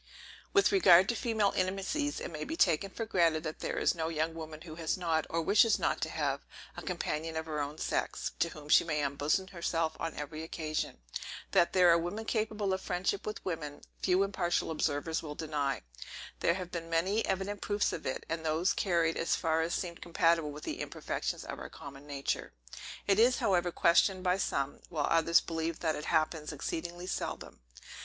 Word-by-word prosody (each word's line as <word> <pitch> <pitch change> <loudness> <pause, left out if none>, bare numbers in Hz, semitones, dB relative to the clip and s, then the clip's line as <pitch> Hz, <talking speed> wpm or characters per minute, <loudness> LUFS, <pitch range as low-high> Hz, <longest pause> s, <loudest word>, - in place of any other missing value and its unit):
With 400 0 +4
regard 190 - +7
to 235 - +1
female 220 -4 +1
intimacies, 195 +11 -1
it - - -5
may 155 -1 -4
be 320 - -4
taken 180 - +3
for 225 +4 -4
granted 165 -6 +2
that 155 -1 -5
there - - -3
is - - +3
no 165 -2 -2
young 160 0 -1
woman 160 -1 -8
who 165 -2 -9
has 160 +1 -1
not, 165 -3 0
or 165 0 0
wishes 215 +6 +5
not - - 0
to - - -1
have, - - -1 0.3
a - - -6
companion 165 -2 -3
of 160 - -2
her 155 -2 -3
own 145 +1 -3
sex, - - -1
to 170 - +2
whom 150 -2 -11
she - - +6
may 150 -3 -1
unbosom 145 +7 0
herself 165 -3 -1
on 165 -1 -3
every 150 +2 -5
occasion. 155 - -3 0.5
That 175 -3 +4
there 180 -2 +6
are 170 - +5
women 205 +7 -4
capable 215 -3 0
of 190 - -2
friendship 190 +3 -1
with 215 - -5
women, 155 -5 -4 0.2
few 185 +1 +3
impartial 180 -4 0
observers 160 +1 0
will 150 -2 -6
deny. 145 - -2 0.6
There 170 - +2
have 180 -2 -6
been 165 -1 -5
many 185 +7 +1
evident 195 +1 -2
proofs 205 0 0
of 155 - -4
it, 130 - -3
and 165 0 -3
those 165 +5 +2
carried 170 -5 +1
as 165 - +1
far 160 -1 +1
as 165 +1 0
seemed 170 -2 -4
compatible 165 -2 +2
with 150 +1 -8
the - - -4
imperfections - - -3
of - - -6
our - - -7
common 140 0 -11
nature. 140 - -3 0.5
It 200 0 +3
is, 245 +2 +5
however, 180 -2 +2
questioned 185 +3 +3
by 180 0 +2
some; 140 -6 -1
while 150 -4 0
others 165 0 +5
believe 165 0 -3
that 160 -2 +1
it 150 - -5
happens 155 -1 0
exceedingly 170 +4 -4
seldom. 185 - -4
165 Hz, 195 wpm, -32 LUFS, 155-190 Hz, 0.6 s, regard